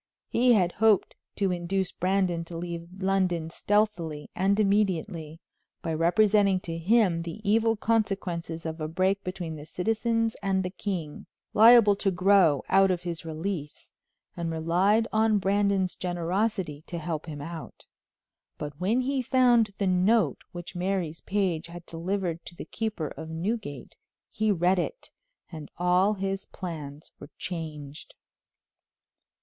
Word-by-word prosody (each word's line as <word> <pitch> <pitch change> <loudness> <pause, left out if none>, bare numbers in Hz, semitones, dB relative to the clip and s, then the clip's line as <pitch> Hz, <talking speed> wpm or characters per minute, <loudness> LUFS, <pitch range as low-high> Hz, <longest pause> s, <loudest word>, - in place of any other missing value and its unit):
He 245 +1 +4
had 180 -5 +3
hoped 220 0 +3 0.2
to 195 -2 +1
induce 180 +2 -1
Brandon 185 -2 0
to 165 0 -8
leave 170 0 -5 0.2
London 180 -4 +1
stealthily 175 -8 -1
and 195 +3 +2
immediately, 185 -6 0 0.4
by 165 - -2
representing 195 +4 +3
to 165 -2 -5
him 185 -2 +3
the 165 +4 -6
evil 225 +2 +3
consequences 195 -7 -1
of 160 0 -5
a 155 - -1
break 190 +4 0
between 180 -4 -5
the 145 - -9
citizens 225 +4 0
and 190 -1 +1
the 180 - -4
king, 175 -7 -5 0.3
liable 225 -1 +7
to 200 - +1
grow 185 -5 +4
out 195 0 +5
of 180 -1 -1
his 170 -1 -5
release, 160 -1 -5 0.4
and 170 -1 -3
relied 180 +7 +2
on 220 -1 +3
Brandon's 200 -1 +1
generosity 180 -2 -2
to 175 - -5
help 160 -1 -4
him 150 -2 -6
out; 160 +2 -8 0.7
but 145 0 -7
when 220 +7 +2
he 270 +1 0
found 245 -3 +4
the 200 - 0
note 190 +5 +2
which 175 0 -8
Mary's 180 -3 -2
page 185 -6 -1
had 170 0 -10
delivered 175 0 -3
to 175 - -10
the - - -8
keeper 215 -9 -3
of 160 0 -8
Newgate, 165 - -4 0.4
he 215 -1 +1
read 180 0 +2
it - - -4 0.4
and 155 -3 -8
all 180 +4 +3
his 195 0 -3
plans 155 -5 -7
were - - -11
changed. 155 -4 -7
185 Hz, 140 wpm, -27 LUFS, 165-205 Hz, 0.7 s, liable